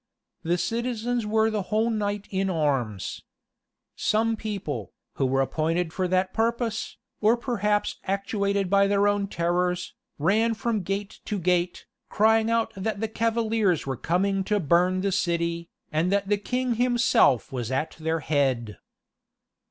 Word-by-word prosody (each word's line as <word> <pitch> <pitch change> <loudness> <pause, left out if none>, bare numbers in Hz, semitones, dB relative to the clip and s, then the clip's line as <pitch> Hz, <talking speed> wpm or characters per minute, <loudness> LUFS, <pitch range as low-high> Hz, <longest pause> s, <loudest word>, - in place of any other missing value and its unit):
The 170 +2 0
citizens 235 +2 -1
were 220 +1 +2
the 215 -1 -1
whole 220 +2 +2
night 205 -2 -2
in 190 0 0
arms. 135 - -1 0.7
Some 225 +1 +1
people, 190 - -5 0.2
who 135 - +2
were 135 +1 +2
appointed 160 +4 -1
for 185 -1 0
that 185 +1 +1
purpose, 230 -1 -1 0.2
or 220 +3 +4
perhaps 210 -4 0
actuated 200 0 0
by 200 +1 +4
their 200 0 +3
own 205 -1 +1
terrors, 180 0 -1 0.2
ran 220 +9 +2
from 225 -1 -1
gate 195 +2 -4
to 210 - -2
gate, 180 -1 0 0.2
crying 220 +1 +3
out 230 -1 +1
that 200 +1 -3
the 220 - -1
cavaliers 220 -5 +1
were 135 -1 -2
coming 195 +7 0
to 210 0 +1
burn 180 +3 +2
the 200 0 0
city, 170 -2 -1 0.2
and 165 +4 +1
that 200 0 +1
the 205 - +3
king 250 +3 -1
himself 240 - +3
was 120 -4 -3
at 135 +4 -1
their 160 0 -1
head. 130 -7 0
200 Hz, 145 wpm, -26 LUFS, 170-220 Hz, 0.7 s, or